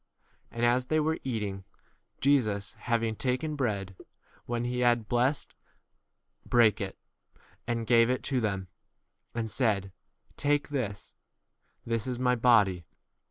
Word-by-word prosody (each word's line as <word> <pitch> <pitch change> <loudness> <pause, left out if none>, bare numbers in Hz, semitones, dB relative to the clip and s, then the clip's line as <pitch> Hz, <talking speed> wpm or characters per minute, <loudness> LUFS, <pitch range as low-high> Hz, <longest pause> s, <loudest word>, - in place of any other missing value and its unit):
And 115 0 -1
as 125 +1 +2
they 155 +2 +2
were 160 +1 0
eating, 105 -6 -3 0.6
Jesus 110 -8 +2
having 115 -2 -1
taken 135 +6 -1
bread, 100 -8 -2 0.5
when 120 0 -2
he 125 0 -2
had 120 -3 +2
blessed, 125 +5 0 0.9
brake 115 -3 +3
[it], 95 -1 -4 0.7
and 115 -1 -1
gave 115 0 +5
[it] 130 0 0
to 130 -3 0
them, 100 -3 -2 0.7
and 115 -2 -2
said, 100 -7 +1 0.5
Take 145 0 +1
u - - -9
[this]: 110 -8 -3 0.7
this 115 0 -1
is 125 -1 -2
my 125 0 +2
23 125 - -2
body. 100 -8 +4
120 Hz, 135 wpm, -29 LUFS, 105-125 Hz, 0.9 s, gave